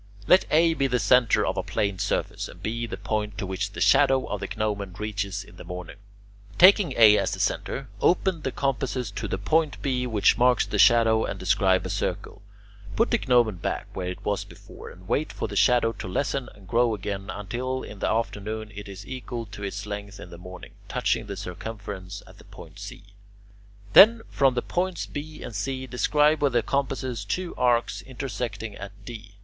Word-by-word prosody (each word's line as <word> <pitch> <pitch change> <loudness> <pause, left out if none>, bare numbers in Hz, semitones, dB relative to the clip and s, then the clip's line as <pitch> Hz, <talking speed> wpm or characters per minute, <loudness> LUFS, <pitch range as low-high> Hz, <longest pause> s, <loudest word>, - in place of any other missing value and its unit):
Let 185 - +5
A 165 +2 +4
be 140 -4 +1
the 125 -1 +1
centre 115 +1 +4
of - - -2
a - - +1
plane 100 -2 -2
surface, - - -2
and 90 +2 -14
B 115 +2 -2
the - - -6
point 105 -1 -3
to - - -3
which 95 +2 -3
the - - -6
shadow 130 +6 +4
of 105 - -4
the 100 - -4
gnomon 100 -3 -2
reaches 100 -2 -3
in 90 - -17
the - - -10
morning. 90 +1 -8 0.6
Taking 190 0 +6
A 110 -2 +7
as - - -1
the - - -5
centre, 135 0 -2
open 180 -1 +2
the 135 - -2
compasses 130 -4 -2
to 105 +2 -4
the 95 - -2
point 155 +9 +1
B, 125 -2 0
which 110 0 +3
marks 125 0 +4
the - - -3
shadow, 115 -2 +5
and 100 - -4
describe 95 0 +2
a - - -3
circle. - - -3 0.5
Put - - +2
the - - +3
gnomon 120 -6 +2
back 85 - -4
where 90 -2 -3
it 90 - -6
was 100 -1 0
before - - -12
and 90 0 -15
wait 150 +8 0
for - - -4
the - - -7
shadow 120 -2 +4
to 105 - -8
lessen 135 +6 -2
and 100 -2 -17
grow 115 +3 +2
again 100 0 -5
until 125 +6 -4
in 105 - -9
the - - 0
afternoon 110 -1 -3
it 105 0 -8
is 100 +1 -9
equal 125 -2 -6
to 105 0 -11
its 100 +1 -4
length 105 0 -7
in 90 - -10
the 85 - -10
morning, 90 0 -10 0.2
touching - - 0
the 100 - -6
circumference 95 0 -7
at - - -17
the - - -16
point - - -13
C. - - -9 0.9
Then 225 +3 +8
from 135 -2 +3
the 120 - -1
points 180 0 -2
B 150 +1 -7
and 115 - -7
C 130 +6 -3
describe 150 +4 +2
with 140 -3 +2
the 120 -2 +2
compasses 130 -5 -2
two 175 - -3
arcs 120 -1 +1
intersecting 120 -5 -5
at 95 +1 -8
D. 110 -3 -10
110 Hz, 200 wpm, -25 LUFS, 100-130 Hz, 0.9 s, Then